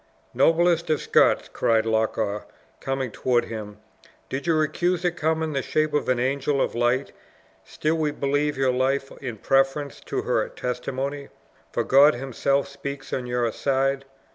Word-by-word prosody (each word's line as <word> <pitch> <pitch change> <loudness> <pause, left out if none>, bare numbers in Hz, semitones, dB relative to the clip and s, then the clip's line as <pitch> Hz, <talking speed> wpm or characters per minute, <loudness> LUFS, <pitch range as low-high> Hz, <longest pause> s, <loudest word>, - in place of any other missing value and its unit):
"Noblest 165 +5 +3
of 155 - +2
Scots!" - - +3
cried 115 -1 +2
Loch 110 0 +1
awe, 105 -1 -1 0.4
coming 135 -2 -2
toward 120 +2 +1
him, 105 -2 -7 0.5
"did 135 +5 -4
your 155 -2 +3
accuser 175 +3 0
come 160 -1 0
in 155 -1 -2
the 135 - 0
shape 155 +3 0
of 150 - 0
an 125 -1 +2
angel 140 +2 0
of - - 0
light, 120 +3 +1 0.5
still 155 +1 -1
we 155 -1 +1
believe 145 0 -1
your 135 -1 +2
life 135 +2 0
in 120 -5 -5
preference 135 +4 +1
to - - -4
her - - 0
testimony, 135 +3 -4 0.4
for - - 0
God 140 +3 +6
himself 135 +2 0
speaks 140 -1 -7
on 125 -2 -2
your 120 -1 0
side. 135 +2 0
135 Hz, 160 wpm, -24 LUFS, 125-150 Hz, 0.5 s, God